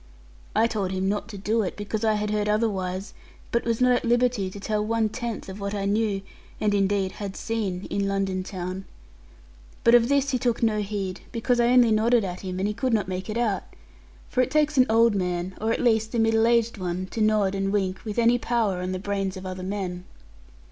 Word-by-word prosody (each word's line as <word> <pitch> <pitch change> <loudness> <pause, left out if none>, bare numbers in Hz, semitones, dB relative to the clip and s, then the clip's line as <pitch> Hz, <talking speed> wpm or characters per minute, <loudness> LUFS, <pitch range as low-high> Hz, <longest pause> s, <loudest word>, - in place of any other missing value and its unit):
I 225 - +4
told 210 -5 -1
him 190 0 -1
not 205 +1 -1
to 215 -3 -8
do 215 +4 0
it, 190 - -3
because 210 +1 -3
I 220 -1 +3
had 210 0 -1
heard 210 0 0
otherwise, 195 -3 -1 0.4
but 235 - 0
was 230 -1 0
not 250 0 +4
at 245 - +2
liberty 240 -4 +2
to 200 - -9
tell 210 +1 -1
one 225 0 +1
tenth 235 -2 -5
of 190 +1 -8
what 200 +1 -3
I 200 -1 -2
knew, 205 -1 0 0.4
and 210 -1 +1
indeed 195 -1 +1
had 200 -1 -6
seen 200 -5 -3
in 200 0 0
London 195 -1 -1
town. 185 0 -5 1.0
But 235 - +5
of 240 0 +6
this 280 0 +2
he 255 - 0
took 240 -1 0
no 215 -2 +2
heed, 195 -2 -4
because 240 +1 0
I 235 - +4
only 245 -2 +5
nodded 225 +2 +3
at 180 -1 -5
him; 185 -1 -5
and 190 +2 0
he 210 - -1
could 230 +2 0
not 210 - 0
make 185 +1 -4
it 215 - -2
out. 220 -5 +1 0.7
For 255 - +1
it 255 - +1
takes 300 +1 +2
an 255 -1 +5
old 230 0 +5
man, 180 -1 -2
or 220 +1 +1
at - - 0
least 220 -1 +2
a - - +2
middle 225 0 +3
aged 235 -2 +2
one, 180 0 -2
to 225 - -3
nod 215 -2 +3
and 195 0 -1
wink, 190 -2 -1
with 215 -1 -5
any 235 +1 +4
power 225 -7 0
on 185 +1 -2
the - - -2
brains 195 0 -2
of 185 - -8
other 185 0 -5
men. 185 -2 -4
210 Hz, 225 wpm, -25 LUFS, 190-230 Hz, 1.0 s, of